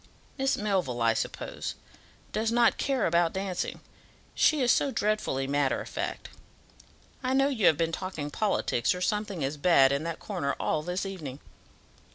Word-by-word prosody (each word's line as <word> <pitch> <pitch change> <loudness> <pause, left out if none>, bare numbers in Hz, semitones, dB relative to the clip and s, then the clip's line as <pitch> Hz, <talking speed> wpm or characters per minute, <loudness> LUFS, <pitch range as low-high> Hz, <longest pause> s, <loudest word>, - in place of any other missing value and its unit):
Miss 270 0 +1
Melville, 180 - 0
I 115 0 +4
suppose, - - -4 0.6
does 220 +1 0
not 235 0 +3
care 270 -2 +1
about 170 0 +2
dancing, 190 -1 -3 0.5
she 305 -2 +3
is 245 -2 +4
so 285 - +2
dreadfully 210 - 0
matter 140 0 +1
of - - -7
fact. - - -4 0.9
I 255 0 0
know 270 +1 +4
you 225 -9 +2
have 155 - +5
been 165 0 0
talking 165 -5 -4
politics, 190 - +1
or 180 - -6
something 205 -4 -1
as 140 +3 -2
bad, 140 -4 +5
in 140 +1 0
that 165 -1 -3
corner 170 -10 -3
all 150 - 0
this 180 +5 -3
evening." 155 -9 -6
180 Hz, 165 wpm, -28 LUFS, 145-215 Hz, 0.9 s, have